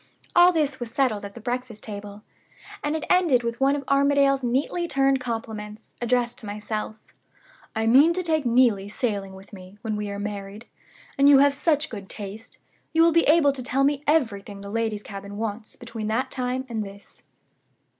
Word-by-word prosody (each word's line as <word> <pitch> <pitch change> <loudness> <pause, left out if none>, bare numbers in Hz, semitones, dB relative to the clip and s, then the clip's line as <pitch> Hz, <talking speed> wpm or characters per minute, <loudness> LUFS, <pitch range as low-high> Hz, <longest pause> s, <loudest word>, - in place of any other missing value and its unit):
All 350 0 +7
this 295 -5 0
was 240 -2 -5
settled 230 -4 0
at 200 - -9
the - - -8
breakfast 245 -1 -4
table; 205 0 -8 0.6
and 295 +1 -1
it 315 - -3
ended 335 -10 +3
with 235 +2 -4
one 275 +1 +4
of 285 - -4
Armadale's 275 -1 +3
neatly 275 +8 0
turned 270 -3 +2
compliments, 220 -3 -6
addressed 240 0 0
to 215 - -9
myself: 210 +1 -4 0.8
'I 220 0 0
mean 270 +8 +6
to 365 +1 -2
take 315 -3 +1
Neelie 235 -5 +3
sailing 200 -4 -3
with 195 +2 -15
me, 185 +1 -12
when 220 -2 -2
we 210 0 -3
are 200 - -5
married. 205 +1 -6 0.5
And 280 +1 +7
you 285 - +8
have 280 +1 +5
such 305 -1 0
good 200 -4 -8
taste, 210 +2 -8 0.4
you 325 0 +5
will 335 - +5
be 335 +1 +3
able 300 -2 +5
to 265 - -6
tell 260 +2 0
me 285 0 +1
everything 210 -10 0
the 200 0 -8
ladies' 220 -2 -2
cabin 200 0 -8
wants 215 0 -5
between 230 -2 -6
that 255 +4 -1
time 255 0 -2
and 225 -3 -3
this. 200 0 -13
235 Hz, 185 wpm, -24 LUFS, 210-275 Hz, 0.8 s, you